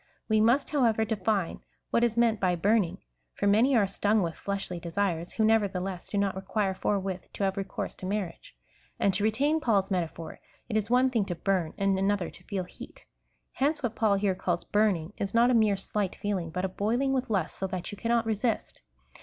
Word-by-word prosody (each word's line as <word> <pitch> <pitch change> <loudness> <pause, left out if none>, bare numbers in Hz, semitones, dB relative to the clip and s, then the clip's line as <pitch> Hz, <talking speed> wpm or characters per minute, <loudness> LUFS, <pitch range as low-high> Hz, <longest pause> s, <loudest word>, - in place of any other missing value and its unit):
We 220 -1 +3
must, 240 +6 +3
however, 230 -7 +2
define 205 -4 -1 0.3
what 235 - +3
is 235 -1 +1
meant 230 -2 +3
by 180 -2 +2
burning; 200 +1 +2 0.4
for - - -2
many 225 +7 +4
are 210 - +4
stung 205 +1 +1
with 165 -1 -2
fleshly 195 -2 -4
desires, 170 0 -2
who, 220 - +2
nevertheless, 195 -4 0
do 205 - -2
not 200 -1 +1
require 195 +1 -1
forthwith 190 -1 -2
to - - -3
have 190 -1 +1
recourse 195 -1 -4
to 185 - -6
marriage. 190 - -4 0.4
And 195 - +3
to 205 +2 0
retain 280 +9 +2
Paul's 205 -8 +1
metaphor, 170 -3 -3 0.3
it 220 - -4
is 215 0 0
one 255 +2 +4
thing 225 -5 +1
to 175 - -3
burn 175 -2 -1
and 195 -1 +1
another 195 -2 0
to - - -16
feel 195 -3 -2
heat. 180 - -12 0.5
Hence 295 +2 0
what 240 -3 -1
Paul 220 -3 +2
here 195 -1 +1
calls 180 -2 -2
burning, 205 -4 +1
is 200 +2 -3
not 240 +2 +5
a - - +3
mere 215 -4 +4
slight 195 0 -2
feeling, 195 -5 -2
but 180 +3 -2
a - - +1
boiling 235 +8 0
with 260 -1 -1
lust, 190 -6 -1
so 190 - -3
that 185 -2 -5
you - - -6
cannot 235 0 +1
resist. 225 +1 -2
200 Hz, 205 wpm, -28 LUFS, 190-225 Hz, 0.5 s, not